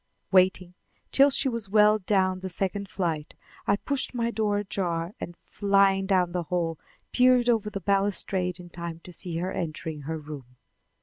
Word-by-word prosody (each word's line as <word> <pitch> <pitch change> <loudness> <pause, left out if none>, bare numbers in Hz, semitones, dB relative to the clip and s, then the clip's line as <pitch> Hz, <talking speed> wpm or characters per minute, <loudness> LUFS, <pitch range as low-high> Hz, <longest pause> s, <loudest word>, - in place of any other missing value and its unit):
Waiting 185 -1 +3 0.4
till 275 +1 +6
she 275 - +2
was 230 -5 -3
well 210 +1 +5
down 185 -1 +1
the 190 0 -5
second 195 +2 -2
flight, 165 -6 -3 0.3
I 200 - +4
pushed 265 +4 -2
my 235 -1 0
door 210 -2 0
ajar 180 -3 -2
and, 175 - -7
flying 195 -1 +2
down 185 -3 +2
the 180 0 -1
hall, 170 -3 -1 0.3
peered 250 -1 +5
over 225 -3 +2
the 200 -1 -5
balustrade 195 -2 0
in 175 -1 -11
time 170 -1 -6
to 180 - -12
see 170 0 -5
her 180 +2 -2
entering 160 -3 -4
her 160 +3 -4
room. 145 -5 -10
190 Hz, 170 wpm, -27 LUFS, 170-205 Hz, 0.4 s, till